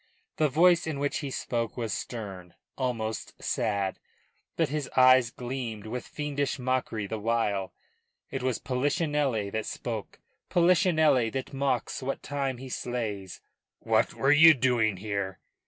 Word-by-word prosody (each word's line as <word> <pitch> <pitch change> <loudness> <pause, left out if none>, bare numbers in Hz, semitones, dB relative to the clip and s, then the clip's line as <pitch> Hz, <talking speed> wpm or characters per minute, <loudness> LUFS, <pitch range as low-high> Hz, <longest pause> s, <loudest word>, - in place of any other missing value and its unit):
The 155 -1 +3
voice 170 +4 +4
in 155 -3 -2
which 145 +1 -1
he 145 - -4
spoke 120 -3 -3
was 115 -4 -2
stern, 95 -7 -6 0.2
almost 115 -4 -3
sad; 100 -3 -1 0.6
but - - +2
his 150 0 -3
eyes 130 -2 +7
gleamed 120 -4 -5
with 120 +3 -5
fiendish 145 -2 -2
mockery 125 -4 -1
the 110 +2 -4
while. 105 -3 0 0.6
It 135 - -3
was 130 -1 0
Polichinelle 140 - 0
that 110 0 -3
spoke 115 -4 -5 0.3
Polichinelle 160 -8 +4
that 135 0 -4
mocks 135 -2 -1
what 135 +1 -3
time 140 -3 -2
he 130 +2 -8
slays. 110 -7 -4 0.4
"What - - +1
were 135 - +3
you 160 +2 +8
doing 120 -6 +2
here?" 100 -2 -3
125 Hz, 140 wpm, -28 LUFS, 110-140 Hz, 0.6 s, you